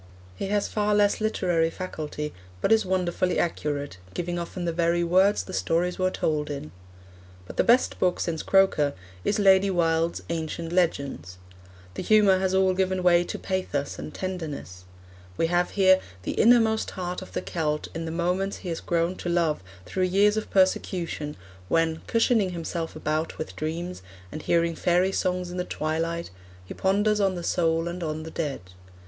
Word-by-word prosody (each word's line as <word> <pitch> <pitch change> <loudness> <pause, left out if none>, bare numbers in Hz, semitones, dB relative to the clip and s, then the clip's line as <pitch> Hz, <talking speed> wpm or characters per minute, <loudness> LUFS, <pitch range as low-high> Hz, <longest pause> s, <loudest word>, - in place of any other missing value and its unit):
He 145 - -4
has 205 0 +1
far 210 -1 +1
less 205 +1 +3
literary 175 -6 +1
faculty, 155 -4 -5 0.3
but 195 - 0
is 220 -3 +4
wonderfully 185 0 0
accurate, 145 - -2 0.2
giving 175 0 -2
often 175 +1 -5
the 170 - 0
very 170 +1 +1
words 190 +4 +3
the 185 - -9
stories 175 +2 0
were 185 0 +2
told 150 -4 -1
in. 140 - -6 0.7
But - - -10
the - - +4
best 245 +2 +3
book 180 -1 +1
since 165 -2 -2
Croker 190 -7 +3 0.3
is 210 - +1
Lady 195 -1 +5
Wilde's 165 -2 +1
Ancient 165 0 -3
Legends. 140 - -1 0.6
The - - -5
humour 205 -3 +5
has 190 0 +1
all 190 -1 +4
given 185 0 0
way 175 -1 +5
to - - -4
pathos 165 -7 -3
and - - -6
tenderness. 150 - -6 0.5
We - - +2
have 175 0 +2
here 190 -1 +6 0.2
the - - -2
innermost 225 -1 +4
heart 180 0 -3
of 185 - -11
the - - -2
Celt 150 -3 -2
in 165 0 -4
the - - -4
moments 180 +4 -1
he - - -3
has 165 - -3
grown 170 +1 0
to 175 - -4
love 170 - +1 0.2
through 185 -1 0
years 200 +3 +3
of 215 - -3
persecution, 180 -5 0 0.3
when, 165 -1 +1
cushioning 225 -5 +2
himself 165 -1 -4
about 155 +1 -2
with 155 - -6
dreams, 170 - -4 0.3
and 155 - -6
hearing 170 +1 +2
fairy 180 +3 +2
songs 180 -2 -1
in 180 - -6
the 180 - 0
twilight, 165 - -2 0.3
he - - -7
ponders 205 +2 +2
on 195 -2 +2
the 175 - -5
soul 165 -1 +1
and 175 +1 -5
on 155 -1 -3
the 160 - -8
dead. 150 - -3
175 Hz, 175 wpm, -26 LUFS, 165-190 Hz, 0.7 s, here